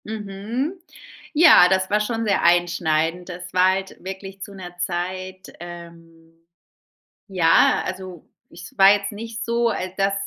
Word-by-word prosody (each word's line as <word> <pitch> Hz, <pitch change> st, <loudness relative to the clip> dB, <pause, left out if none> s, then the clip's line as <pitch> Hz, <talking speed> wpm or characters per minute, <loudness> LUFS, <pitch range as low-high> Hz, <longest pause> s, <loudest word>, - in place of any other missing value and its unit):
Mhm. 215 Hz, -, -4 dB, 0.6 s
Ja, 305 Hz, -, +7 dB
das 190 Hz, 0 st, +1 dB
war 210 Hz, +1 st, +2 dB
schon 225 Hz, +1 st, -2 dB
sehr 200 Hz, -2 st, +1 dB
einschneidend. 170 Hz, 0 st, +1 dB
Das 175 Hz, 0 st, -9 dB
war 185 Hz, 0 st, +4 dB
halt 190 Hz, 0 st, -5 dB
wirklich 195 Hz, +1 st, -8 dB
zu 200 Hz, -, -8 dB
'ner 180 Hz, -2 st, -10 dB
Zeit 185 Hz, +1 st, -5 dB
ähm, 165 Hz, -1 st, -12 dB, 0.9 s
ja, 175 Hz, -5 st, +3 dB
also 185 Hz, -3 st, -8 dB, 0.2 s
es 170 Hz, +2 st, -13 dB
war 195 Hz, 0 st, +7 dB
jetzt 200 Hz, 0 st, -2 dB
nicht 225 Hz, +2 st, -7 dB
so, 235 Hz, 0 st, 0 dB
al 185 Hz, -4 st, -4 dB
dass 195 Hz, 0 st, +1 dB
185 Hz, 140 wpm, -22 LUFS, 175-205 Hz, 0.9 s, Ja